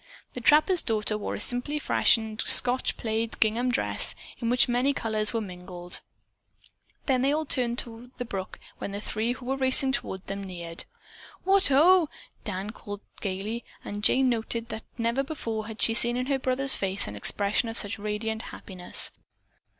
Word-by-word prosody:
The 250 Hz, -, -5 dB
trapper's 310 Hz, +7 st, +5 dB
daughter 215 Hz, -2 st, 0 dB
wore 210 Hz, -, -3 dB
a -, -, -5 dB
simply 250 Hz, +5 st, -1 dB
fashioned 225 Hz, -6 st, +2 dB
Scotch 250 Hz, +2 st, 0 dB
plaid 225 Hz, 0 st, -2 dB
gingham 230 Hz, +3 st, +2 dB
dress 250 Hz, -, 0 dB, 0.2 s
in 230 Hz, -, -1 dB
which 250 Hz, +2 st, +4 dB
many 250 Hz, +3 st, +2 dB
colors 215 Hz, -1 st, -1 dB
were 230 Hz, -, -1 dB
mingled. 180 Hz, -2 st, -7 dB, 1.0 s
They 265 Hz, 0 st, +2 dB
all 310 Hz, +1 st, 0 dB
turned 245 Hz, -4 st, 0 dB
toward 240 Hz, +2 st, -4 dB
the 245 Hz, -, -4 dB
brook 195 Hz, -4 st, -5 dB, 0.2 s
when 200 Hz, -, -5 dB
the 200 Hz, -, -3 dB
three, 220 Hz, +3 st, -1 dB
who 255 Hz, 0 st, -11 dB
were 265 Hz, +2 st, -1 dB
racing 265 Hz, 0 st, +6 dB
toward 190 Hz, -8 st, -4 dB
them, 200 Hz, 0 st, -5 dB
neared. 170 Hz, -3 st, -7 dB, 0.6 s
"What, 390 Hz, 0 st, +4 dB
ho!" 325 Hz, +4 st, +5 dB, 0.3 s
Dan 200 Hz, 0 st, -4 dB
called 205 Hz, -2 st, -8 dB, 0.2 s
gayly, 205 Hz, +4 st, -3 dB, 0.2 s
and 205 Hz, +1 st, -5 dB
Jane 260 Hz, +4 st, +4 dB
noted 230 Hz, -1 st, -2 dB
that 220 Hz, -1 st, -5 dB, 0.2 s
never 235 Hz, +3 st, +1 dB
before 230 Hz, -7 st, -4 dB
had 220 Hz, -1 st, -2 dB
she 225 Hz, -, +5 dB
seen 240 Hz, +1 st, +6 dB
in 250 Hz, -, -1 dB
her 275 Hz, 0 st, 0 dB
brother's 265 Hz, +1 st, +2 dB
face 195 Hz, 0 st, +1 dB
an 100 Hz, -, -6 dB
expression 200 Hz, -, +1 dB
of 225 Hz, -, -3 dB
such 205 Hz, +1 st, -2 dB
radiant 215 Hz, +2 st, -3 dB
happiness. 185 Hz, -3 st, -1 dB
230 Hz, 170 wpm, -27 LUFS, 210-255 Hz, 1.0 s, racing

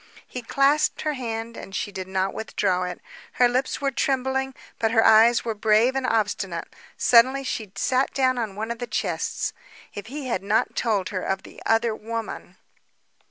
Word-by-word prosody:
He 250 Hz, -, -6 dB
clasped 275 Hz, +5 st, +2 dB
her 305 Hz, -, -1 dB
hand 230 Hz, -3 st, -5 dB
and 195 Hz, -, -9 dB
she 205 Hz, -, -2 dB
did 190 Hz, -1 st, -6 dB
not 190 Hz, 0 st, -1 dB
withdraw 185 Hz, -4 st, -1 dB
it. 180 Hz, -1 st, -6 dB, 0.3 s
Her 245 Hz, -, +4 dB
lips 255 Hz, +2 st, -1 dB
were 275 Hz, -1 st, +1 dB
trembling, 265 Hz, 0 st, -1 dB, 0.2 s
but 225 Hz, -, +2 dB
her 225 Hz, 0 st, +3 dB
eyes 225 Hz, +2 st, +6 dB
were 225 Hz, -, -1 dB
brave 220 Hz, +4 st, +3 dB
and 265 Hz, -1 st, 0 dB
obstinate. 205 Hz, -6 st, -1 dB, 0.3 s
Suddenly 260 Hz, +3 st, +5 dB
she 220 Hz, -6 st, -4 dB
sat 255 Hz, +6 st, +1 dB
down 255 Hz, -2 st, +1 dB
upon 215 Hz, -4 st, -3 dB
one 220 Hz, +2 st, -4 dB
of 235 Hz, -, -5 dB
the 245 Hz, -, -4 dB
chests. -, -, -2 dB, 0.4 s
If 205 Hz, +1 st, -7 dB
he 280 Hz, +3 st, -6 dB
had 235 Hz, -7 st, -1 dB
not 205 Hz, +3 st, 0 dB
told 210 Hz, -5 st, 0 dB
her 185 Hz, -2 st, -3 dB
of 190 Hz, +1 st, -2 dB
the -, -, -13 dB
other 225 Hz, 0 st, +2 dB
woman! 225 Hz, +1 st, -6 dB
230 Hz, 180 wpm, -24 LUFS, 205-255 Hz, 0.4 s, eyes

